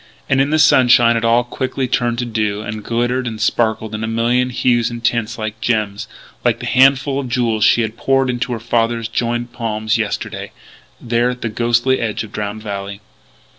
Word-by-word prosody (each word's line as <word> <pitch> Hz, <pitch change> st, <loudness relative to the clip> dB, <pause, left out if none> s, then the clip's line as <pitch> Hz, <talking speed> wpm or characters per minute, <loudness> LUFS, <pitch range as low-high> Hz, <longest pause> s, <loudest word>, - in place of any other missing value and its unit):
And, 135 Hz, 0 st, +2 dB
in 140 Hz, -, +1 dB
the 155 Hz, -, +2 dB
sunshine, 120 Hz, -5 st, +5 dB
it 115 Hz, -, -1 dB
all 115 Hz, +1 st, +3 dB
quickly 130 Hz, +1 st, -3 dB
turned 120 Hz, -1 st, 0 dB
to 120 Hz, -, -2 dB
dew, 105 Hz, -2 st, -2 dB
and 105 Hz, 0 st, -6 dB
glittered 120 Hz, +3 st, -1 dB
and 110 Hz, -2 st, -5 dB
sparkled 110 Hz, -1 st, 0 dB
in 110 Hz, +1 st, -4 dB
a -, -, -2 dB
million 120 Hz, +3 st, +1 dB
hues 120 Hz, -1 st, +1 dB
and 120 Hz, -1 st, -7 dB
tints 120 Hz, -2 st, 0 dB
like 110 Hz, -1 st, -5 dB
gems 105 Hz, -4 st, -1 dB, 0.4 s
like -, -, +2 dB
that -, -, -4 dB
handful 135 Hz, +1 st, +4 dB
of 130 Hz, -3 st, -5 dB
jewels 115 Hz, -3 st, 0 dB
she 120 Hz, -, +4 dB
had 110 Hz, 0 st, -5 dB
poured 135 Hz, 0 st, +1 dB
into 125 Hz, +1 st, -2 dB
her 115 Hz, -, -4 dB
father's 115 Hz, 0 st, 0 dB
joined 120 Hz, +1 st, -2 dB
palms 110 Hz, -1 st, -1 dB
yesterday 105 Hz, -2 st, -4 dB, 0.5 s
there 120 Hz, +1 st, 0 dB
at 125 Hz, 0 st, -5 dB
the 115 Hz, -, -2 dB
ghostly 120 Hz, +3 st, +1 dB
edge 110 Hz, -1 st, -2 dB
of 110 Hz, -, -11 dB
Drowned 105 Hz, +1 st, -5 dB
Valley. 100 Hz, -1 st, -5 dB
115 Hz, 195 wpm, -18 LUFS, 110-125 Hz, 0.5 s, sunshine